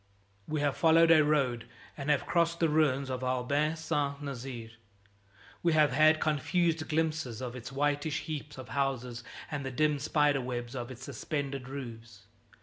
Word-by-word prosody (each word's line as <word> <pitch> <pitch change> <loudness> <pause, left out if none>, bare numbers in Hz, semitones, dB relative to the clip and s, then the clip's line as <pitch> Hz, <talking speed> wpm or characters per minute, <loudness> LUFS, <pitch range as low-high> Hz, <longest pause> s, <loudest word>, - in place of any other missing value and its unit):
We 155 -1 -1
have 145 -2 +1
followed 165 0 +5
a 155 -2 +7
road 135 -6 +1 0.3
and 140 0 -5
have 145 -2 +2
crossed 170 0 +1
the 165 - +3
ruins 140 -3 +2
of 130 0 -3
Ablain 130 +5 0
Saint 145 -3 -2
Nazaire. 125 -4 -6 0.9
We 170 -2 +2
have 155 -3 +4
had 155 +3 +5
confused 160 +2 +1
glimpses 155 -7 -1
of 125 -1 -5
its 125 0 -7
whitish 145 +2 0
heaps 150 -2 -6
of 130 -3 -9
houses 125 -2 -2 0.3
and 145 -2 -3
the 135 - -3
dim 150 +2 +1
spider 145 -1 +2
webs 120 0 -4
of 120 -1 -4
its 130 0 -9
suspended 140 0 -4
roofs. 115 -6 -8
140 Hz, 160 wpm, -30 LUFS, 125-155 Hz, 0.9 s, a